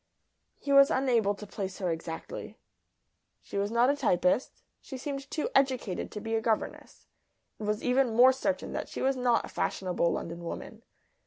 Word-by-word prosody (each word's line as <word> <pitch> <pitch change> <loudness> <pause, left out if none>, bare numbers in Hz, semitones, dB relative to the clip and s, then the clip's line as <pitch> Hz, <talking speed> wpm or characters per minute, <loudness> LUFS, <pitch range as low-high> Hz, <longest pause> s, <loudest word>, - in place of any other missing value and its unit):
He 280 - -2
was 275 +1 +8
unable 240 -8 +2
to 210 - -9
place 195 -1 -5
her 180 -3 -1
exactly. 165 0 -6 0.9
She - - -10
was 200 +1 0
not 235 +2 +3
a - - -1
typist. 230 -4 +1 0.2
She 265 - -8
seemed 275 +1 -5
too 310 - -2
educated 255 -8 +1
to 210 - -5
be 225 +2 -4
a 225 - +1
governess. 220 -1 -3 0.5
It 215 - -5
was 210 +1 -1
even 250 -2 +2
more 250 +2 +8
certain 275 +2 -2
that - - -4
she - - -4
was 270 +1 +2
not 245 -2 +2
a - - -11
fashionable 180 -2 0
London 170 +1 -5
woman. 220 +6 -7
230 Hz, 175 wpm, -29 LUFS, 200-265 Hz, 0.9 s, was